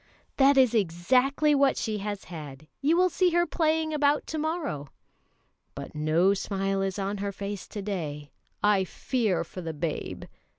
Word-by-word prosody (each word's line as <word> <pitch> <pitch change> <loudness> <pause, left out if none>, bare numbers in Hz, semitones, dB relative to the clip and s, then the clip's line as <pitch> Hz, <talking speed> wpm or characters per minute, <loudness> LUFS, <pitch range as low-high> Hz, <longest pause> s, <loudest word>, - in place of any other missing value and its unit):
"That 275 0 +5
is 255 -3 +5
exactly 250 - +2
what 275 -1 +3
she 215 -2 -2
has 205 -1 -4
had; 150 -4 -9 0.2
you 310 +4 +3
will 365 0 +4
see 365 +2 +3
her 345 0 +3
playing 315 -2 0
about 295 0 +2
to 315 - -4
morrow." 305 - -2 0.9
"But - - -7
no 155 +5 +3
smile 195 0 -1
is 195 0 -2
on 200 +1 -2
her 200 0 -2
face 200 0 -6
to 205 - -6
day; 150 -7 -4 0.3
I 205 -2 +4
fear 200 -3 -1
for 180 +2 -9
the 165 -2 -4
babe." 155 +1 -4
205 Hz, 165 wpm, -27 LUFS, 180-285 Hz, 0.9 s, That